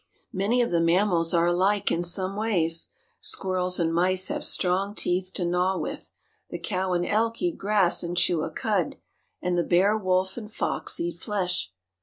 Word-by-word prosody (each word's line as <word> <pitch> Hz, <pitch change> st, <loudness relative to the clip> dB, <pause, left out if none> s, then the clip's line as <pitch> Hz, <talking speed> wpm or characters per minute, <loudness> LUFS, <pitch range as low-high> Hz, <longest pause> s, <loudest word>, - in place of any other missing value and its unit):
Many 215 Hz, +6 st, +2 dB
of 235 Hz, -, -2 dB
the 170 Hz, -, +2 dB
mammals 170 Hz, -1 st, +3 dB
are 170 Hz, -1 st, +3 dB
alike 185 Hz, +4 st, +2 dB
in 170 Hz, -, +1 dB
some 185 Hz, +2 st, 0 dB
ways. 175 Hz, -7 st, 0 dB, 0.3 s
Squirrels 185 Hz, -1 st, -1 dB
and 165 Hz, -1 st, +1 dB
mice 185 Hz, +2 st, +2 dB
have -, -, -3 dB
strong 190 Hz, +3 st, +1 dB
teeth 185 Hz, -1 st, -2 dB
to 180 Hz, -, -1 dB
gnaw 180 Hz, +2 st, +1 dB
with; -, -, -6 dB, 0.4 s
the -, -, -5 dB
cow 185 Hz, -2 st, -2 dB
and 175 Hz, 0 st, 0 dB
elk 230 Hz, +2 st, 0 dB
eat 345 Hz, -2 st, 0 dB
grass 200 Hz, -3 st, +2 dB
and 175 Hz, 0 st, -4 dB
chew 175 Hz, -2 st, +2 dB
a -, -, -2 dB
cud, 185 Hz, 0 st, -1 dB, 0.5 s
and 180 Hz, 0 st, 0 dB
the 175 Hz, -, +2 dB
bear, 190 Hz, +5 st, +3 dB
wolf, 190 Hz, -1 st, 0 dB
and 215 Hz, -2 st, -7 dB
fox -, -, -2 dB
eat 170 Hz, 0 st, -3 dB
flesh. 180 Hz, -, -2 dB
185 Hz, 180 wpm, -26 LUFS, 175-200 Hz, 0.5 s, mammals